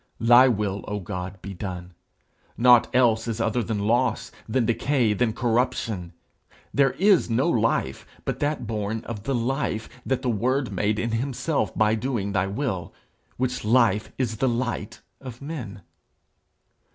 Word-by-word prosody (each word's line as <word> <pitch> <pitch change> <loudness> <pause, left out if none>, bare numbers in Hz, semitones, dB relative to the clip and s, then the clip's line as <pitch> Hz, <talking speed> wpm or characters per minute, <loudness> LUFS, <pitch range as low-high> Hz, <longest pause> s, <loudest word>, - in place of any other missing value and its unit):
Thy 120 +3 +7
will, 105 -4 -1
O 105 0 -3
God, 90 0 -6
be 100 - -6
done! 90 -1 -6 0.6
Nought 120 -1 +6
else 115 -3 +3
is 115 -1 -3
other 115 +1 +1
than 105 -2 -2
loss, 120 +1 +1 0.2
than 120 +1 +1
decay, 120 -1 +1
than 115 +2 +1
corruption. 115 -6 -1 0.6
There 135 -2 +3
is 195 -6 +3
no 115 - +2
life - - 0 0.2
but - - -2
that 145 -3 -1
born 110 0 -3
of 105 -3 -7
the 135 - 0
life 120 -2 -1 0.2
that 130 - -1
the - - -1
Word 125 +3 0
made 105 +2 0
in 115 +1 -1
himself 135 +6 -1
by 110 0 +3
doing 115 -3 -2
thy 95 -1 +1
will, 100 -4 -3 0.5
which 125 0 -2
life 110 -2 +3
is 115 -4 -1
the 130 +4 +2
light 120 -2 -3 0.2
of 125 -3 -9
men. 125 - -7
115 Hz, 150 wpm, -25 LUFS, 105-125 Hz, 0.6 s, Thy